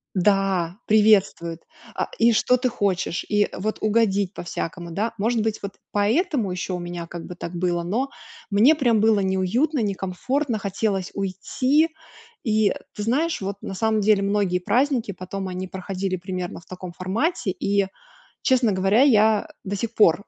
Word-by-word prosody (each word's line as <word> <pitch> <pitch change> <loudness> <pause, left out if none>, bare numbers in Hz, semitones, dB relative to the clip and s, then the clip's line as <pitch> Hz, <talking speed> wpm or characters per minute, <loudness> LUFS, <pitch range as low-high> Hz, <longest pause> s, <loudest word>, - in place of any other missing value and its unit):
Да, 190 -2 +1
приветствует. 200 -6 +3 0.3
А, - - -1
и 230 0 +5
что 250 +3 +3
ты 255 0 0
хочешь, 190 -5 -1
и 205 0 +2
вот 215 +3 -2
угодить 205 -3 +2
по-всякому, 170 0 -5
да. 220 +7 -1
Может 225 +2 +1
быть, 220 0 -1
вот 200 - -4 0.2
поэтому 225 - +1
ещё 180 0 -3
у - - -4
меня 175 -1 -6
как 170 -1 -7
бы 180 - -7
так 175 0 -7
было, 175 -1 0
но 230 +11 -1 0.4
мне 235 +10 +6
прям 240 -7 +2
было 220 -2 +4
неуютно, 190 - +1
некомфортно, 215 +6 -1
хотелось 195 -1 -1
уйти. 255 - +1 0.5
И 215 -2 +3 0.2
ты 210 - -6
знаешь, 285 +6 0
вот 195 +1 -3
на - - -5
самом 220 +2 +1
деле 205 -1 +4
многие 200 -2 +1
праздники 235 +1 +1
потом, 190 +2 -5
они 185 0 -4
проходили 190 0 -3
примерно 180 -1 -5
в 175 - -20
таком 185 -1 -8
формате, 210 - -1
и, 200 +1 0 0.6
честно 250 -4 +3
говоря, 195 +5 +3
я 220 -5 +4
до 200 +1 -3
сих 230 +3 -4
пор 195 -2 +4
200 Hz, 160 wpm, -23 LUFS, 185-225 Hz, 0.6 s, мне